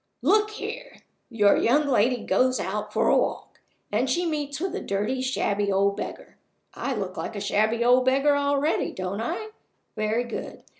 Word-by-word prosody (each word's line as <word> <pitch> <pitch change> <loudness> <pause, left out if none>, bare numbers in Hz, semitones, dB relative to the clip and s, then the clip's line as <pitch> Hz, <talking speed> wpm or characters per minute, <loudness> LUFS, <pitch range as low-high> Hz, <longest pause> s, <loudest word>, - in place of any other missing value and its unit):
Look 425 0 +4
here! 450 +4 -8 0.3
Your 210 -4 +4
young 290 +5 +3
lady 245 -1 +2
goes 255 0 +2
out - - -3
for - - +1
a - - +5
walk, - - -2 0.3
and 260 - +1
she 345 +7 +1
meets 295 -3 -3
with 370 +1 -2
a 415 - -3
dirty, 210 +7 -2
shabby 205 -6 0
old 200 +1 +2
beggar - - -8 0.3
I 275 - -3
look 195 -3 -4
like 220 - -5
a - - -3
shabby 215 +3 +1
old 250 +1 +5
beggar 275 +3 +3
already, 285 +2 0
don't 185 +3 -4
I? 355 - -3 0.5
Very 215 +2 0
good. 240 - -7
255 Hz, 170 wpm, -25 LUFS, 210-290 Hz, 0.5 s, a